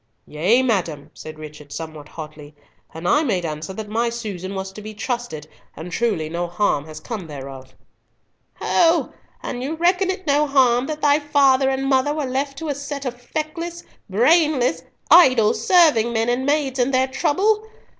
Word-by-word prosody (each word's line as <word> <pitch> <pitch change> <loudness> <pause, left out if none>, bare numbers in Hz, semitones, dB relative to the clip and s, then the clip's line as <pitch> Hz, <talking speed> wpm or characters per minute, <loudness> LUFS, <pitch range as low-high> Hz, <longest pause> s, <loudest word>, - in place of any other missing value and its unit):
"Yea, 190 +12 +2
madam," 170 - -1
said 155 0 -10
Richard, 150 -2 -11
somewhat 155 -2 -8
hotly, 150 -2 -10 0.4
"and 165 +2 -6
I 295 - +4
made 195 - -1
answer 155 +2 -5
that 215 +2 -6
my 230 +3 0
Susan 200 -5 -6
was 190 0 -4
to 210 - -10
be 215 +1 -9
trusted, 225 - -4 0.3
and 165 +3 -8
truly 195 -6 -1
no 170 +2 -3
harm 175 -5 0
has 155 -1 -9
come 215 -8 -6
thereof." 135 -3 -9 0.8
"Ho! 335 -1 +2 0.3
and 245 - -4
you 285 +5 -3
reckon 360 +3 +2
it 375 -1 -3
no 295 0 +2
harm 255 -3 +3
that 310 -1 -5
thy 290 0 +4
father 275 -3 +3
and 270 0 -1
mother 270 +2 +2
were 300 -2 -2
left 275 +2 -2
to 320 0 -5
a - - +1
set 280 0 -6
of 245 -1 -5
feckless, 330 +5 -5 0.3
brainless, 255 - +3 0.3
idle 255 -10 +7
serving 300 -11 +4
men 225 0 0
and 255 +3 0
maids 285 -3 0
in 250 +1 +2
their 260 0 +2
trouble? 380 +11 +1
245 Hz, 175 wpm, -21 LUFS, 175-290 Hz, 0.8 s, idle